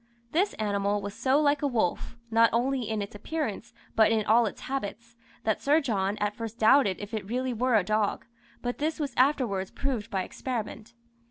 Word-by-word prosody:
This 380 +6 +1
animal 205 -1 0
was 200 0 -6
so 265 +6 +2
like 290 -1 +2
a 290 - +2
wolf, 230 -2 -1
not 230 +1 +5
only 250 0 0
in 215 -2 -1
its 200 - -9
appearance, 250 +2 -4 0.2
but 220 0 +5
in 220 -2 +1
all 230 +1 +4
its - - -7
habits, 235 -2 -5 0.3
that 220 -1 0
Sir 295 +3 +4
John 205 -8 -1
at 210 0 -1
first 230 0 -6
doubted 220 -4 +4
if 205 +2 -8
it 210 -2 -4
really 255 +2 -1
were 245 +1 +1
a 210 - +4
dog, 215 +1 0 0.4
but 245 0 -3
this 310 +2 -1
was 290 -2 -2
afterwards 250 -8 +2
proved 250 -6 -3
by 190 -4 -1
experiment. 230 0 -5
230 Hz, 190 wpm, -28 LUFS, 205-265 Hz, 0.4 s, not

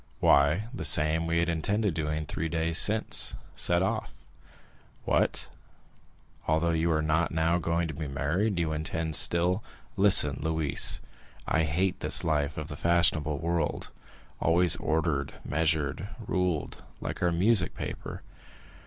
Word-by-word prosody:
"Why, 75 +8 +3
the - - -6
same 80 +2 +2
we 85 0 0
had 85 0 +1
intended 95 +4 -1
doing 75 0 -3
three 80 +2 -4
days 80 0 0
since—set 100 -4 +1
off." 95 - -3 0.9
"What?—although 80 +2 -4
you 80 +1 0
are 80 -1 0
not 80 +2 0
now 80 +2 0
going 85 0 -1
to 80 - -6
be 75 +1 -6
married, 80 +9 -1
you 80 -2 -1
intend 80 0 -1
still——" 90 +6 +4 0.3
"Listen, 95 -8 +5
Louise. 80 -2 0 0.5
I 80 0 +1
hate 90 +5 -1
this - - +4
life 75 -2 -1
of 75 -1 -5
the 75 - -7
fashionable 80 -2 +1
world, 85 0 -3 0.5
always 85 0 +3
ordered, 80 -3 -2
measured, 80 +3 -1 0.2
ruled, 90 -9 -2 0.2
like - - -6
our 90 - +1
music 90 +1 +2
paper. - - -7
80 Hz, 130 wpm, -27 LUFS, 75-85 Hz, 0.9 s, Listen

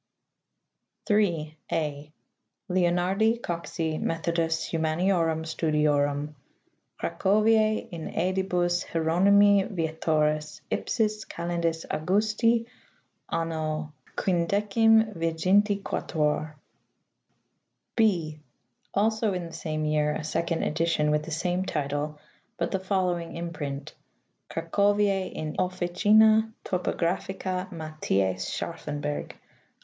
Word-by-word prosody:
3. 170 -8 +1 0.2
{a) 150 -1 -2 0.6
Leonardi 185 +5 +2
Coxi 165 -4 -3
Methodus 165 0 -1
humaniorum 165 0 +1
studiorum. 150 -2 +1 0.6
Cra - - -2
coviae 215 +2 +3
in 165 -2 -6
sedibus 180 -1 0
Hieronymi 195 +5 +4
Vietoris, 155 -3 0
ipsis 215 -2 0
Calendis 170 -1 -2
Augusti 215 +7 +2 0.6
Anno 155 -2 -2 0.3
IM.D.XXVI. 195 -4 +2 1.5
(8) 165 -8 +1 0.6
Also 215 0 +2
in 180 -2 -3
the 165 - -10
same 155 -1 -3
year 150 0 +1
a 155 - -4
second 165 +2 -1
edition 155 -1 +1
with 150 0 +2
the - - -7
same 180 +3 -1
title, 150 -2 -2 0.4
but 170 - -1
the 190 - 0
following 185 -3 -1
imprint: 150 -5 -5 0.6
Cracovis 200 +3 +1
in 155 -1 -5
officina 210 +5 +4
typographica 185 +1 -2
Matthiffi 155 - -1
Scharffenberg. 145 0 -4
170 Hz, 80 wpm, -27 LUFS, 155-195 Hz, 1.5 s, Hieronymi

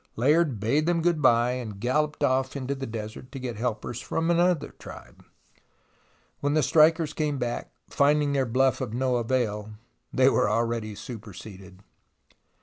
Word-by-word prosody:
Layard 145 0 +2
bade 140 +10 +1
them 170 -2 +1
good 170 -3 +1
bye, 120 -2 +4
and 115 -6 -5
galloped 150 +6 0
off 130 -1 +1
into 135 0 -2
the 135 -1 -5
desert 110 +3 -7
to 135 - -7
get 125 -2 -5
helpers 120 0 -3
from 165 +1 -1
another 175 -2 +2
tribe. - - -12 1.2
When 145 +1 0
the 155 - +3
strikers 160 -1 +4
came 150 -2 -1
back, 120 -2 -3 0.2
finding 145 0 +2
their 135 -2 +1
bluff 130 +1 +2
of 110 - -4
no 130 0 +1
avail, 110 -3 -1 0.4
they 130 0 +4
were 135 - +3
already 115 -1 -1
superseded. 100 -4 -10
130 Hz, 150 wpm, -26 LUFS, 115-150 Hz, 1.2 s, bye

